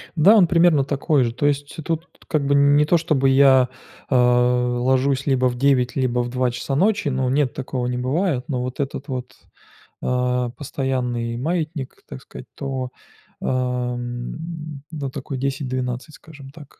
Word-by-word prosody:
Да, 190 +8 +6
он 180 - +6
примерно 165 -4 +4
такой 140 0 +1
же. 115 -1 -1
То 145 - 0
есть 145 0 -1
тут, 165 +1 -2 0.2
как 150 -3 0
бы, 140 - +2
не 140 +1 +5
то 170 - +4
чтобы 150 -5 +1
я, 135 -2 +5 0.4
э, 130 - +1
ложусь 125 +2 +2
либо 130 -2 +2
в 120 - -4
9, 130 -2 +2
либо 125 -2 0
в 120 - -3
2 125 0 0
часа 125 +3 -3
ночи, 200 +1 +2
но 130 -1 0
нет, 135 -2 +1
такого 130 -2 -3
не 125 - -2
бывает, 135 +2 0
но 130 -5 -2
вот 125 +2 -5
этот 140 +1 -3
вот, 125 -2 -5 0.7
а, 125 -1 0
постоянный 125 -3 -3
маятник, 155 -1 -3
так 65 - -8
сказать, - - -11
то, 130 -2 -4 0.5
ам, 125 +5 -3
ну, 145 -4 -4
такой 135 0 -5
10-12, 130 0 -3
скажем 145 -4 -13
так. 145 -1 -15
135 Hz, 160 wpm, -22 LUFS, 125-145 Hz, 0.7 s, Да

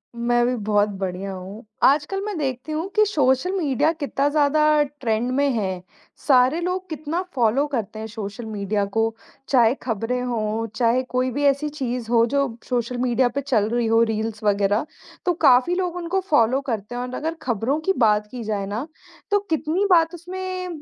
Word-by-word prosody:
मैं 240 0 +2
भी 250 +1 +1
बहुत 210 -1 +1
बढ़िया 190 +1 -3
हूँ। 190 +4 -9 0.2
आजकल 295 +8 +3
मैं 415 -5 -3
देखती 265 +1 -3
हूँ 320 +4 -2
कि 425 0 +5
सोशल 285 -2 +2
मीडिया 305 -5 +1
कितना 285 -3 -1
ज़्यादा 305 +1 +3
ट्रेंड 245 -5 -2
में 285 +1 +2
है, 190 -5 -2 0.4
सारे 265 +4 +4
लोग 370 +1 -2
कितना 315 +3 -3
फॉलो 245 +3 +2
करते 220 -6 -4
हैं 220 - -5
सोशल 215 0 -7
मीडिया 205 -1 -1
को, 225 +2 -1 0.3
चाहे 240 -3 +5
खबरें 235 +1 -2
हों, 225 -2 -2
चाहे 240 +3 +2
कोई 255 0 -1
भी 285 +4 -2
ऐसी 280 +2 +2
चीज़ 250 -5 -4
हो, 230 -1 +5
जो 275 -1 -1
सोशल 245 0 -1
मीडिया 245 0 +2
पे 280 +4 -3
चल 225 -6 +1
रही 240 -1 0
हो, 225 +1 +4
रील्स 220 -1 -2
वगैरह 205 +3 +2 0.4
तो 355 - +3
काफ़ी 260 +2 +4
लोग 360 -2 -2
उनको 355 +2 -1
फॉलो 255 -1 +3
करते 220 0 -3
हैं 245 - -3
और 250 0 -5
अगर 320 +2 -2
खबरों 240 +5 -1
की 385 +5 +1
बात 210 -3 +3
की 245 -2 -6
जाए 210 -2 -2
ना, 215 +8 -4 0.4
तो 410 - +4
कितनी 320 +4 0
बात 330 -2 +4
उसमें, 370 +1 -5
250 Hz, 180 wpm, -23 LUFS, 225-300 Hz, 0.4 s, कि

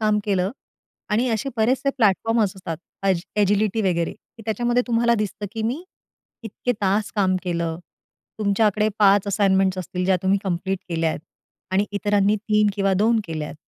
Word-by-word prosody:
काम 215 -1 +2
केलं 190 -2 +1 0.6
आणि 230 +4 +2
असे 230 +4 -1
बरेचसे 250 +5 +2
प्लॅटफॉर्म्स 220 -2 +2
असतात. 170 -4 -5 0.3
अज 190 -3 +2 0.2
"एजिलिटी" 205 +1 +2
वगैरे. 170 -4 0 0.3
त्याच्यामध्ये 240 +3 +1
तुम्हाला 235 0 +2
दिसतं, 210 -1 -3
की 225 - -4
मी 245 +9 -2 0.6
इतके 230 +3 -2
तास 200 +2 +1
काम 190 -2 +2
केलं. 170 -2 -2 0.6
तुमच्याकडे 210 0 +2
5 200 -1 +5
असाइनमेंट्स 190 -2 +2
असतील 180 0 -3
ज्या 190 0 +3
तुम्ही 190 +1 +2
कंप्लीट 190 +1 -1
केल्याय 165 -2 -1 0.5
आणि 200 +2 +2
इतरांनी 205 0 +2
3 210 0 +2
किंवा 195 -1 +2
2 220 +4 +3
केल्यात. 155 -3 -5
205 Hz, 145 wpm, -23 LUFS, 190-220 Hz, 0.6 s, 5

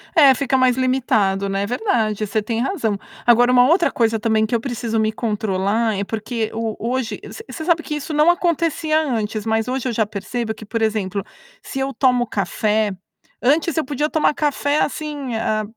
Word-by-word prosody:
é 280 -4 +7
fica 270 -1 +1
mais 255 -1 +3
limitado, 220 -7 +1
né. 195 0 -1
É - - -1
verdade, 220 - 0
você 215 +2 0
tem 225 +2 -2
razão. 240 - -1 0.3
Agora 245 +1 +5
uma 250 0 +6
outra 335 +3 +3
coisa 225 -1 +1
também 220 0 +2
que 220 - -1
eu - - +1
preciso 230 -3 -2
me 215 0 +1
controlar, 215 0 0
é 200 - -1
porque 220 +1 -3
o 225 -1 -3
hoje 245 +1 -2
você 445 - -9
você 315 - -6
sabe 335 -2 +2
que 300 - -4
isso 295 +2 -5
não 300 +2 +4
acontecia 330 -2 +1
antes, 220 -7 -2
mas 225 +1 0
hoje 260 0 -2
eu 245 - -1
já 220 -1 +1
percebo 220 +3 -4
que, 220 - -12
por 225 +2 -3
exemplo, 205 -3 -1 0.4
se 270 - -6
eu 270 +1 -2
tomo 250 -3 +2
café 210 +2 0 0.5
antes 305 +5 +2
eu 320 - +1
podia 295 +2 -1
tomar 310 -1 +2
café, 290 0 0
assim, 290 -4 -3
eh, 215 -1 0
235 Hz, 195 wpm, -20 LUFS, 215-280 Hz, 0.5 s, é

